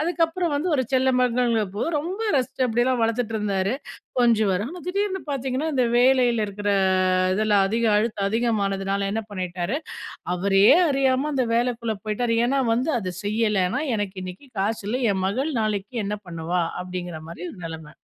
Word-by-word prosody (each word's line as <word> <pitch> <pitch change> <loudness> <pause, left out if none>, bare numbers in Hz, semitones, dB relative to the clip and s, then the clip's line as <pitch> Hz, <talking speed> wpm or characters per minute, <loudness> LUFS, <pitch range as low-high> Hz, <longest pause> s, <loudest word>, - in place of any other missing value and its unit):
அதுக்கப்புறம் 335 +1 0
வந்து 310 +6 -1
ஒரு 260 - +2
செல்ல 260 0 +3
மகள்ங்குறப்போ 230 -5 +1 0.2
ரொம்ப 365 +8 -4 0.2
ரசிச்சு 260 0 0
அப்படியெல்லாம் 240 +2 +1
வளர்த்துட்ருந்தாரு. 220 -3 0 0.5
கொஞ்சுவாரு. 215 -5 +3
ஆனா 355 +3 -8
திடீர்னு 385 0 -1
பாத்தீங்கன்னா, 270 +2 -2
இந்த 255 -2 +3
வேலையில 245 -3 +4
இருக்கிற 205 +1 -2 0.6
இதில, 215 +1 +1 0.2
அதிக 230 +2 0
அழுத்து 215 -1 0
அதிகமானதுனால 200 -3 0
என்ன 225 - -1
பண்ணிட்டாரு? 185 - -3 0.6
அவரயே 195 +5 +5 0.2
அறியாம 270 +1 +1
அந்த 255 -3 +1
வேலைக்குள்ள 235 -2 0
போய்ட்டாரு. 230 +2 0
ஏன்னா 275 +2 +1
வந்து, 255 +7 +1
"அதை 185 -3 -4
செய்யலைன்னா, 210 +2 +1
எனக்கு 205 -2 -3
இன்னிக்கு 185 +9 -9
காசு 210 +2 -1
இல்ல. 245 +4 0
என் 190 - -2
மகள் 265 +10 -1
நாளைக்கு 210 0 -2
என்ன 210 - -2
பண்ணுவா?"அப்படிங்கிற 175 +1 -3
மாரி 170 +1 -8
ஒரு - - -13
நெலம. 160 -2 -9
225 Hz, 145 wpm, -24 LUFS, 195-260 Hz, 0.6 s, அவரயே